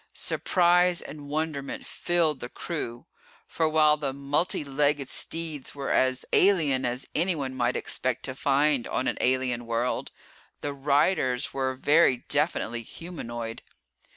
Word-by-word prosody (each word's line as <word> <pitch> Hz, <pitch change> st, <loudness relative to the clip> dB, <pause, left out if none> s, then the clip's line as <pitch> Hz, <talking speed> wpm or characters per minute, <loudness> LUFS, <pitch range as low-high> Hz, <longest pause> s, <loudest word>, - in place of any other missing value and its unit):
Surprise 180 Hz, 0 st, +2 dB
and 145 Hz, -1 st, -9 dB
wonderment 150 Hz, -2 st, -3 dB
filled 165 Hz, -5 st, +1 dB
the 120 Hz, -, -6 dB
crew, 125 Hz, -9 st, -5 dB, 0.4 s
for 160 Hz, -1 st, 0 dB
while 155 Hz, -1 st, +4 dB
the 145 Hz, -3 st, -2 dB
multi 140 Hz, +5 st, -1 dB
legged 140 Hz, 0 st, 0 dB
steeds 160 Hz, -5 st, -3 dB
were 140 Hz, -1 st, -3 dB
as 130 Hz, 0 st, +2 dB
alien 150 Hz, -10 st, +4 dB
as 125 Hz, +2 st, -2 dB
anyone 155 Hz, -6 st, 0 dB
might 125 Hz, -1 st, 0 dB
expect 130 Hz, -1 st, -2 dB
to 130 Hz, -, -4 dB
find 140 Hz, -1 st, +2 dB
on 130 Hz, -, -1 dB
an -, -, -1 dB
alien 125 Hz, -2 st, 0 dB
world, 115 Hz, +2 st, -1 dB, 0.5 s
the 145 Hz, -, -3 dB
riders 140 Hz, -2 st, +1 dB
were 130 Hz, -1 st, -1 dB
very 145 Hz, -2 st, +3 dB
definitely 140 Hz, -6 st, +1 dB
humanoid. 120 Hz, -6 st, -7 dB
140 Hz, 130 wpm, -27 LUFS, 130-155 Hz, 0.5 s, while